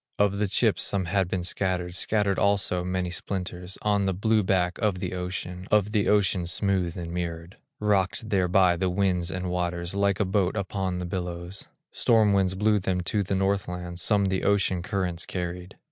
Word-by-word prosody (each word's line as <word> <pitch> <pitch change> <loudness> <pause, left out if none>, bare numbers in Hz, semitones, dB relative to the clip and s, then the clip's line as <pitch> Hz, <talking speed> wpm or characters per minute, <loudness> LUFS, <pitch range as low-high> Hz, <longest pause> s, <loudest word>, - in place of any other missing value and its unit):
Of 100 -1 +2
the 105 - +1
chips - - +2
some 100 -2 0
had 95 +1 +1
been 90 0 -2
scattered, 90 -1 -1
Scattered 100 0 +1
also 100 -3 +2
many 90 0 -2
splinters, 90 0 -4
On 100 -1 +2
the 95 -1 0
blue 110 +3 +2
back 90 -2 0
of 105 -4 +1
the 90 - -4
ocean, 90 0 -5
Of 105 -1 +3
the 105 -2 +1
ocean 95 -4 +2
smooth 95 -2 0
and 85 -1 -5
mirrored, 85 0 -5 0.2
Rocked 105 +1 +1
there 95 -4 +2
by 90 -1 +4
the 95 +1 0
winds 90 -2 0
and 90 +1 -3
waters, 85 0 -2
Like 100 -1 +1
a 105 - +2
boat 95 0 +1
upon 95 -2 -2
the 90 - -3
billows; 90 +1 -5 0.2
Storm 110 -3 +3
winds 95 -1 +2
blew 105 +1 +2
them 90 -1 -1
to 100 +4 0
the 95 0 -1
Northland, 90 -3 -1
Some 100 +1 +2
the 95 -1 0
ocean 95 -3 +2
currents 90 -2 -3
carried. 90 0 -5
95 Hz, 185 wpm, -26 LUFS, 90-100 Hz, 0.2 s, by